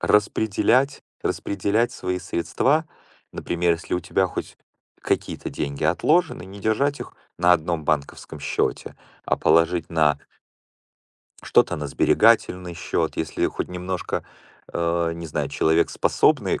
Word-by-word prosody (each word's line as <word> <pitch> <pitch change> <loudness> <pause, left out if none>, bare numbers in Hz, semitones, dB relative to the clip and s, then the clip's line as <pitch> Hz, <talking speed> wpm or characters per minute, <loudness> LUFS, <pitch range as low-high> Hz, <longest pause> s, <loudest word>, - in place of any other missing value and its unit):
распределять, 110 +5 +2 0.2
распределять 105 +5 0
свои 90 0 -3
средства, 110 - 0 0.5
например, 85 0 0
если 85 +1 -3
у 90 - -1
тебя 95 +2 +1
хоть - - -6 0.4
какие-то - - -2
деньги 70 -1 -4
отложены, 90 - +2
не 100 +1 -11
держать 140 +8 0
их - - -8 0.2
на 90 0 +5
1 85 -1 0
банковском 75 +1 -2
счёте, 70 - -2 0.3
а - - +1
положить 85 0 +2
на 75 -3 +2 1.2
что-то - - +3
на 75 -1 -4
сберегательный 90 0 +2
счёт, 80 - -2
если 80 -1 -1
хоть - - -4
немножко, 90 0 -4 0.5
э, 85 0 0
не 85 0 -7
знаю, 75 - -2
человек 80 +1 +2
способный - - +2
90 Hz, 125 wpm, -23 LUFS, 80-100 Hz, 1.2 s, на